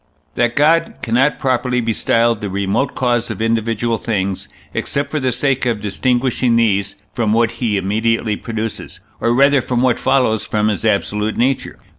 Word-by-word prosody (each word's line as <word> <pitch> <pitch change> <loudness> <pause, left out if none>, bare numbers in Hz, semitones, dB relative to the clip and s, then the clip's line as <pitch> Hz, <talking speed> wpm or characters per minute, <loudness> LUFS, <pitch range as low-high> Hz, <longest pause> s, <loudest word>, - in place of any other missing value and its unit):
That 120 -1 0
God 165 +3 +3
cannot 125 +4 +2
properly 125 -1 0
be 115 -1 -1
styled 115 0 +1
the 105 - -3
remote 100 +7 -1
cause 120 -2 0
of - - -5
individual 115 0 0
things, 100 -4 -2 0.3
except 140 0 -2
for 155 - -1
the 130 -2 0
sake 130 +1 0
of 115 -3 0
distinguishing 120 +3 0
these 100 -4 +1 0.2
from 110 -3 0
what 115 0 +2
he 110 -4 +1
immediately 110 +3 0
produces, 110 0 -5 0.2
or 120 0 +1
rather 140 +1 +4
from 125 0 -1
what 125 -2 +2
follows 130 -5 +2
from 105 0 0
his 105 - -2
absolute 105 0 0
nature. 130 +2 0
115 Hz, 165 wpm, -18 LUFS, 110-125 Hz, 0.3 s, rather